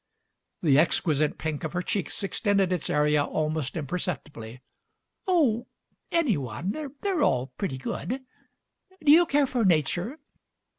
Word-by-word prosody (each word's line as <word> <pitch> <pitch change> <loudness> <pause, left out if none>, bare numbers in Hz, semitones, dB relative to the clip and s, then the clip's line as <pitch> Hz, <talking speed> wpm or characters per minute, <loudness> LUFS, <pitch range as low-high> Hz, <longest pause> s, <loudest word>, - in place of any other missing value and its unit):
The 145 -4 +5
exquisite 155 -2 +2
pink 155 -2 -4
of 155 - -4
her 180 0 -1
cheeks 200 0 -1
extended 195 -2 +1
its 175 - -2
area 150 0 +3
almost 155 -1 -2
imperceptibly. 135 -6 -5 0.6
"Oh, 280 - +2 0.4
any 300 - +2
one. 135 - -4 0.3
They're 385 -6 0
all 130 -1 +1
"pretty 155 -10 -3
good. 255 - -4 0.8
Do 290 - +6
you 340 +3 +7
care 290 -1 +3
for 250 -3 -1
Nature?" 175 - +1
175 Hz, 130 wpm, -27 LUFS, 150-230 Hz, 0.8 s, you